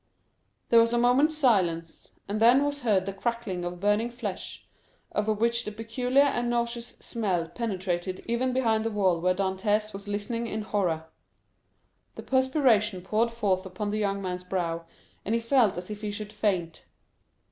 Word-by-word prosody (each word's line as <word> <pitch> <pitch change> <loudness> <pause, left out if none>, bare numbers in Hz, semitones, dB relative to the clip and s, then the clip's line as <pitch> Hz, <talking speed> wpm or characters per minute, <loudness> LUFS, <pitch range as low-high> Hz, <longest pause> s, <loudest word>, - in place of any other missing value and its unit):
There 230 - +7
was 230 +1 +3
a - - +3
moment's 265 +6 +3
silence, 175 - +1 0.2
and 205 +2 -2
then 245 +5 +6
was 290 0 -2
heard 210 -7 +2
the 195 - -3
crackling 200 -3 -3
of 175 0 -5
burning 205 +4 +2
flesh, 235 -6 -6 0.4
of 210 0 -1
which 235 +1 +2
the 210 - -5
peculiar 245 +5 +1
and 240 -4 0
nauseous 235 0 -2
smell 190 -8 -1
penetrated 185 -4 -3
even 240 +2 0
behind 225 -4 +1
the 225 - 0
wall 190 -5 +1
where 180 +1 +2
Dantès 205 +3 0
was 200 +1 -8
listening 210 +3 -2
in 220 -1 -3
horror. 180 -7 -1 1.1
The - - -8
perspiration 260 - +2
poured 220 +4 +1
forth 200 -5 0
upon 195 +2 -4
the 215 - -1
young 200 -1 -1
man's 180 -1 -3
brow, 170 -3 -2 0.4
and 220 - 0
he - - +2
felt 230 -5 +3
as 180 +3 -6
if 210 0 -6
he 210 - -3
should 210 0 -6
faint. 185 -6 -1
210 Hz, 170 wpm, -27 LUFS, 190-235 Hz, 1.1 s, There